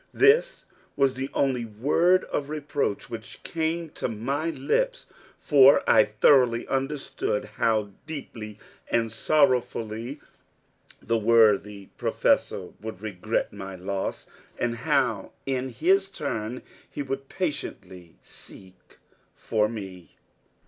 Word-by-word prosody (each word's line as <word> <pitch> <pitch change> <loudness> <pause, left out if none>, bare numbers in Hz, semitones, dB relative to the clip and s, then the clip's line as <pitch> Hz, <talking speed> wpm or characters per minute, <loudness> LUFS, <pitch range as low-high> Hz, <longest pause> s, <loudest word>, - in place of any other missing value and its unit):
This 475 +4 +4 0.3
was 135 -2 +3
the 135 +1 -4
only 130 -3 +1
word 145 - +2
of 145 -1 -3
reproach 145 -7 -2
which 115 0 -9
came 165 0 -2
to - - -3
my 135 +8 -2
lips; - - -1 0.3
for 140 -2 +6
I 110 - +6
thoroughly 120 +2 +4
understood 135 -6 -2
how 105 -1 0 0.2
deeply 115 -9 -7 0.3
and 115 -1 +1
sorrowfully 125 -1 +1 0.8
the 115 0 +1
worthy 105 -3 +3
Professor - - +1
would 110 -3 -7
regret 110 +1 -2
my 95 -2 -7
loss, 95 +1 -4 0.3
and 120 -1 -1
how 125 -6 0
in 130 -1 -1
his 190 - +2
turn 125 - -4 0.3
he 145 - -4
would 135 0 -5
patiently 95 - -5
seek 95 -1 -11 0.4
for 105 -1 0
me. 95 -7 -8
120 Hz, 110 wpm, -26 LUFS, 105-145 Hz, 0.8 s, for